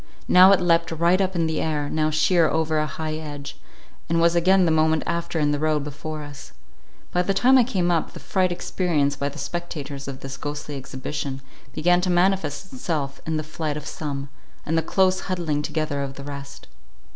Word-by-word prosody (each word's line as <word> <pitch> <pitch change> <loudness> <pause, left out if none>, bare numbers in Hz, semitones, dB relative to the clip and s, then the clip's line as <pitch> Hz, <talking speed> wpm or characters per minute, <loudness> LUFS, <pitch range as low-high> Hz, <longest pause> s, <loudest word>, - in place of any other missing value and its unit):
Now 185 +1 +8
it 195 - +5
leapt 170 -2 +2
right 170 +4 +3
up 190 -1 0
in 165 -1 +1
the 160 -1 -1
air, 150 -2 -1
now 155 +1 0
sheer 160 +2 +3
over 160 0 +1
a 155 - 0
high 155 +2 -4
hedge, 150 -2 -6 0.5
and 165 0 +2
was 170 +1 +4
again 185 +2 +4
the 165 - +2
moment 160 0 +3
after 170 0 -2
in 145 -1 +2
the 145 - 0
road 155 -1 +1
before 150 +1 -6
us. 145 -1 -11 0.6
By 180 - +2
the 195 +2 0
time 255 +6 +5
I 255 - +7
came 185 -7 0
up, 165 -2 0
the - - -9
fright 185 -2 0
experienced 160 -5 0
by 140 - 0
the - - -11
spectators 145 -2 -5
of 135 -1 -6
this 135 0 -6
ghostly 145 0 -5
exhibition, 135 0 -5 0.3
began 175 +5 +2
to 185 - -1
manifest 180 -2 +1
itself 150 - -3
in 160 -1 0
the 155 - -2
flight 155 -1 -4
of 150 - -8
some, 140 -3 -5 0.4
and 160 - -1
the 165 - +3
close 185 +3 +2
huddling 170 -6 -2
together 150 -2 -2
of 135 -1 -4
the 140 - -8
rest. 140 0 -8
155 Hz, 205 wpm, -24 LUFS, 145-175 Hz, 0.6 s, Now